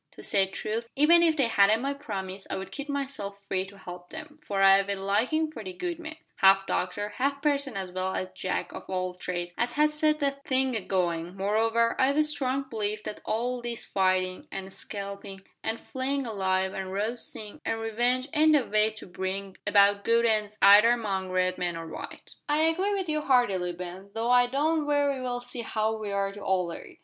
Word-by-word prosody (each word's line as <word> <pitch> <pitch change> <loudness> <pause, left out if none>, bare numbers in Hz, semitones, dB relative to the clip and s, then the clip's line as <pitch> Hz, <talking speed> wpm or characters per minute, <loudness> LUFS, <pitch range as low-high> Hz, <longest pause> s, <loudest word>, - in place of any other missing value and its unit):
To - - -12
say 195 -1 +2
truth, 220 +4 -4
even 325 +5 +6
if 325 -2 +3
they 275 - +4
hadn't 215 -1 +4
my 275 +3 -1
promise 195 -8 -6
I'd 190 - -5
keep 285 +1 -6
myself 270 -8 -3
free 190 -1 -1
to 200 +1 -14
help 180 -1 -10
'em, 305 -1 -9
for 195 -1 0
I've 195 +1 +6
a 200 - 0
likin' 225 +12 0
for 260 - -8
the 185 -2 -6
good 340 - -4
man 315 -2 -7 0.2
half 195 0 +5
doctor, 205 +3 -2
half 280 +2 0
parson 280 -5 0
as 190 -2 -4
well 185 +1 -2
as 185 - -3
Jack 185 0 -3
of - - -9
all 185 -1 -2
trades 175 -1 -4
as 240 +1 0
has 300 +1 +3
set 305 0 +2
the 280 -2 +2
thing 265 -2 0
agoin' 180 -3 -1
moreover, 225 +4 +2
I've 275 +2 +3
a 305 - +5
strong 275 -3 +1
belief 215 -3 -3
that 210 - -6
all 245 +3 -1
this 235 -1 -4
fightin', 185 -1 0
an' 195 0 -6
scalpin', 200 -1 -6 0.3
an' 225 - -2
flayin' 270 +2 -3
alive, 190 -3 0
an 190 -1 -4
roastin', 210 +1 -4
an' 225 - -1
revenge, 240 +4 0
ain't 310 0 +5
the 280 -5 +4
way 215 +1 +3
to 220 0 -9
bring 190 +1 -4
about 200 0 +5
good 230 0 +3
ends 215 -2 +1
either 205 +3 +9
among 195 -5 -2
Red 185 0 0
men 175 -1 -1
or 165 - -6
white." 160 - -9 0.2
"I 300 +1 +3
agree 370 +6 +1
with 380 -2 -2
you 305 -1 0
heartily, 205 -11 +2
Ben, 180 +2 -8
though 230 +2 0
I 245 0 +6
don't 300 +4 0
very 285 -2 +1
well 245 -1 -3
see 245 0 -5
how 220 -1 -1
we 215 -2 -5
are 200 0 0
to 205 +1 -10
alter 180 -3 -1
it. - - -14
215 Hz, 200 wpm, -28 LUFS, 190-270 Hz, 0.3 s, either